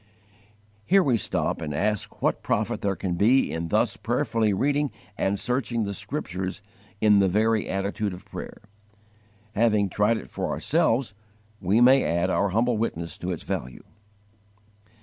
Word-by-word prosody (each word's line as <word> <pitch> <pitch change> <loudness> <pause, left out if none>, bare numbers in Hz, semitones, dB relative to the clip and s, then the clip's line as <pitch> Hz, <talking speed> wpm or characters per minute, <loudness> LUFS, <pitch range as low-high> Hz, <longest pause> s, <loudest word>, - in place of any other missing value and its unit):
Here 195 - +4
we 130 -6 +2
stop 105 - -1
and 75 -2 -4
ask 105 +3 -2
what - - +1
profit 110 +1 -1
there 100 -1 0
can 90 +1 -3
be 115 +9 +3
in 80 +1 -3
thus - - +1
prayerfully 110 -1 0
reading 145 +8 +1 0.3
and 100 0 0
searching 125 -1 -1
the 100 -1 -3
Scriptures 95 - -4 0.4
in 105 -1 +5
the 100 - +4
very 110 +3 +1
attitude 100 +2 -2
of 90 - -10
prayer. - - -9 0.9
Having 105 -3 +2
tried 105 +4 +2
it - - -8
for - - -4
ourselves, 115 -3 +1 0.5
we 100 +5 +2
may 130 +2 +6
add 85 +1 0
our 100 - +1
humble 115 +4 +1
witness 85 -7 -3
to 90 - -4
its 85 -4 -4
value. 65 0 -5
105 Hz, 150 wpm, -25 LUFS, 95-115 Hz, 0.9 s, may